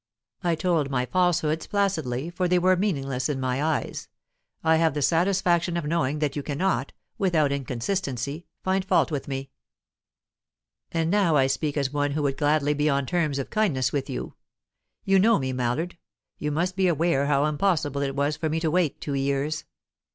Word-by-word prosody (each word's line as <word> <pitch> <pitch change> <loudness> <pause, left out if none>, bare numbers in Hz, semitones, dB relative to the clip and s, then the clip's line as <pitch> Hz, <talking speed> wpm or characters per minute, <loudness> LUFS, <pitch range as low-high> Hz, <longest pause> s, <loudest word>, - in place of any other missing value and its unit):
I 170 -2 +2
told 160 -4 0
my 125 -2 0
falsehoods 160 -1 +1
placidly, 165 -8 -1
for 180 +1 0
they 180 0 +3
were 185 +1 +4
meaningless 140 -10 -1
in 140 -2 -1
my 130 +1 -1
eyes. 155 -1 -2 0.6
I 160 0 +4
have 160 -2 +2
the 145 - 0
satisfaction 175 +1 +2
of 170 - -3
knowing 150 -2 0
that 150 -2 -1
you 145 - -2
cannot, 145 -1 -1 0.3
without 160 -7 +2
inconsistency, 140 +2 -3 0.2
find 190 0 +1
fault 185 - +2
with 145 -3 -3
me. 135 -1 -5 1.4
"And 165 0 0
now 195 -6 +3
I 135 -2 +4
speak 140 +3 -1
as 140 -1 -1
one 145 -1 0
who 150 0 -1
would 135 -1 0
gladly 150 -1 +2
be 150 +1 +1
on 140 -1 +1
terms 155 -3 0
of 135 - -4
kindness 140 - +1
with 140 -2 -2
you. - - -5 0.7
You 195 0 +4
know 225 +3 +5
me, 130 -3 -2
Mallard; 130 +8 -2 0.4
you 150 - -2
must 175 +5 -1
be 190 -1 +2
aware 160 -4 +2
how 145 0 +3
impossible 150 -2 0
it 135 -1 -2
was 145 +2 0
for 160 +1 -2
me 160 +1 0
to 160 -1 0
wait 175 -4 +1
two 145 - -3
years. 140 +3 -1
150 Hz, 180 wpm, -25 LUFS, 140-175 Hz, 1.4 s, know